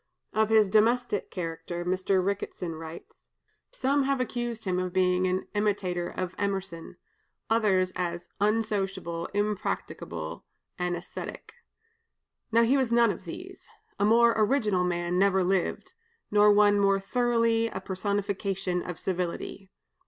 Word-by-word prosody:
Of 220 0 +2
his 220 -2 +5
domestic 220 +1 +2
character 170 0 -5
Mr. 185 +1 +1
Ricketson 190 -3 -3
writes: 160 +1 -11 0.4
"Some 285 - +1
have 275 -1 +1
accused 240 -2 -3
him 180 -1 0
of 185 0 -2
being 185 0 +2
an 185 +1 -1
imitator 195 -4 0
of 185 -1 -4
Emerson, 190 -4 -3 0.5
others 195 -5 +3
as 175 -1 -3
unsocial, 200 -5 -1
impracticable, 200 - -3 0.4
and 180 0 0
ascetic. 175 - -8 1.0
Now, 230 +1 +5
he 255 +4 +3
was 260 -3 +1
none 235 -2 +5
of 190 0 -8
these. 360 - -9 0.3
A - - +2
more 230 +2 +5
original 215 -4 +2
man 175 0 0
never 190 -1 +3
lived, 185 - -1 0.4
nor 210 0 +6
one 205 0 +5
more 195 -1 +3
thoroughly 230 +1 +1
a 190 - -5
personification 195 -1 -2
of 175 -2 -6
civility. 185 +1 -4
195 Hz, 130 wpm, -28 LUFS, 180-220 Hz, 1.0 s, nor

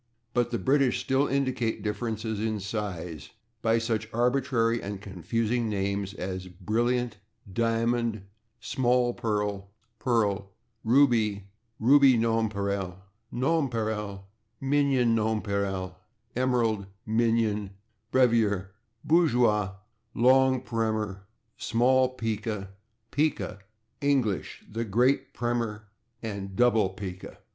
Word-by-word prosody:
But 120 -1 +2
the 120 - -1
English 135 +4 +2
still 135 +2 +2
indicate 130 -4 -1
differences 110 0 -2
in 110 -1 -1
size 90 -7 -5 0.3
by 115 0 +3
such 115 -1 -1
arbitrary 120 -1 +1
and 100 0 -5
confusing 110 +4 -1
names 100 -1 -2
as 95 0 -4
/brilliant/, 115 +6 -1 0.4
/diamond/, 115 -1 0 0.4
/small 125 0 +1
pearl/, 105 -3 -2 0.3
/pearl/, 105 -4 +1 0.4
/ruby/, 115 -5 +3 0.4
/ruby 135 +1 +6
nonpareil/, 100 -5 0 0.3
/nonpareil/, 115 -8 -1 0.4
/minion 135 -3 +2
nonpareil/, 100 -4 -1 0.4
/emerald/, 120 -6 +1 0.2
/minion/, 110 -2 +1 0.4
/brevier/, 110 -7 +3 0.4
/bourgeois/, 120 - +3 0.4
/long 130 +1 +4
primer/, 110 -4 -2 0.3
/small 130 +2 +2
pica/, 110 -3 -3 0.4
/pica/, 150 -8 0 0.4
/English/, 135 -9 0
/great 115 +4 +1
primer/ 115 -3 -2 0.3
and 100 -3 -5
/double 110 -5 +3
pica 95 -2 -7
115 Hz, 90 wpm, -28 LUFS, 100-125 Hz, 0.4 s, ruby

